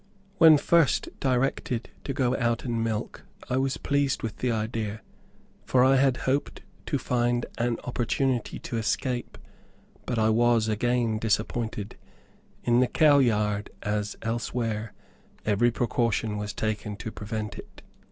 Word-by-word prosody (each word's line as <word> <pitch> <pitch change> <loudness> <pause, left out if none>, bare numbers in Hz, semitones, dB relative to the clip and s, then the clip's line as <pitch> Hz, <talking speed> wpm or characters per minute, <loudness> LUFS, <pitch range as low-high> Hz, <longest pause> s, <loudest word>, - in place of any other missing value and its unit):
When 160 -2 +9
first 165 0 +3
directed 125 -2 -1
to - - -2
go 130 -2 +1
out 120 -2 0
and 115 -2 -1
milk, 110 -2 -3 0.3
I 125 - +2
was 135 0 0
pleased 140 -1 0
with 115 -2 -4
the 125 - 0
idea, 110 -1 -3 0.6
for 125 -1 +3
I 135 +1 +5
hoped 135 +1 0 0.2
to 145 - +1
find 120 -1 0
and 120 0 0
opportunity 125 0 -1
to 115 - -5
escape; 120 +3 -2 0.7
but 120 - -1
I 110 0 +3
was 115 0 +3
again 115 0 +1
disappointed. 110 -1 -2 0.7
In 120 0 +3
the 130 - +4
cow 150 -1 +5
yard, 105 -4 +1
as 105 0 -2
elsewhere, 115 -1 -2 0.5
every 110 +3 +3
precaution 115 -2 0
was 105 0 -3
taken 105 -1 -3
to 110 +2 -6
prevent 105 0 -5
it. - - -13
120 Hz, 135 wpm, -27 LUFS, 110-125 Hz, 0.7 s, When